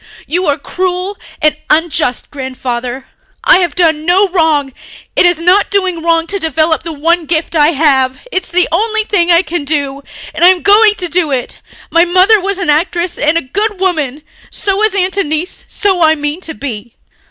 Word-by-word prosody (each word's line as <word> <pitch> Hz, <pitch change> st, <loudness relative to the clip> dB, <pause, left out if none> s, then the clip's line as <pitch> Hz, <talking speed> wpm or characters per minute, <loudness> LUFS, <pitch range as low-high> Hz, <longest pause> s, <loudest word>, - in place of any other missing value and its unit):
"You 355 Hz, +2 st, -1 dB
are 285 Hz, -, +1 dB
cruel 365 Hz, +5 st, -3 dB, 0.3 s
and 305 Hz, 0 st, +3 dB
unjust, 305 Hz, -5 st, 0 dB
Grandfather. 255 Hz, -2 st, -5 dB, 0.4 s
I -, -, +5 dB
have 345 Hz, -5 st, -1 dB
done 320 Hz, -4 st, +1 dB
no 370 Hz, +5 st, +3 dB
wrong... 315 Hz, -6 st, +1 dB, 0.4 s
it 360 Hz, -, +4 dB
is 350 Hz, -2 st, +2 dB
not 365 Hz, +4 st, +3 dB
doing 375 Hz, -4 st, -1 dB
wrong 330 Hz, 0 st, +1 dB
to 400 Hz, +3 st, -4 dB
develop 320 Hz, 0 st, 0 dB
the 330 Hz, +1 st, -6 dB
one 325 Hz, +2 st, 0 dB
gift 330 Hz, +1 st, -2 dB
I 295 Hz, -1 st, +4 dB
have. 265 Hz, -3 st, +2 dB
It's 375 Hz, -4 st, -1 dB
the 360 Hz, +1 st, +2 dB
only 435 Hz, +5 st, 0 dB
thing 365 Hz, -5 st, 0 dB
I 340 Hz, +1 st, +5 dB
can 345 Hz, -4 st, -4 dB
do... 280 Hz, -2 st, -3 dB, 0.3 s
and 315 Hz, +2 st, -2 dB
I -, -, +8 dB
am 365 Hz, -1 st, +3 dB
going 415 Hz, +1 st, +5 dB
to 365 Hz, -4 st, -4 dB
do 340 Hz, -2 st, 0 dB
it. 260 Hz, -3 st, -4 dB, 0.3 s
My 335 Hz, +1 st, +5 dB
mother 375 Hz, +4 st, +4 dB
was 395 Hz, 0 st, -2 dB
an 360 Hz, -6 st, 0 dB
actress 345 Hz, +3 st, -1 dB
and 305 Hz, +2 st, +2 dB
a -, -, -1 dB
good 405 Hz, +9 st, -3 dB
woman. 310 Hz, -7 st, -1 dB, 0.3 s
So 395 Hz, 0 st, -2 dB
is 435 Hz, -2 st, +1 dB
Aunt 380 Hz, 0 st, 0 dB
Annice. 315 Hz, -1 st, -2 dB
So 385 Hz, -4 st, 0 dB
I 315 Hz, -1 st, +4 dB
mean 295 Hz, +3 st, -4 dB
to 320 Hz, -3 st, -7 dB
be." 235 Hz, -4 st, -7 dB
335 Hz, 190 wpm, -13 LUFS, 295-370 Hz, 0.4 s, I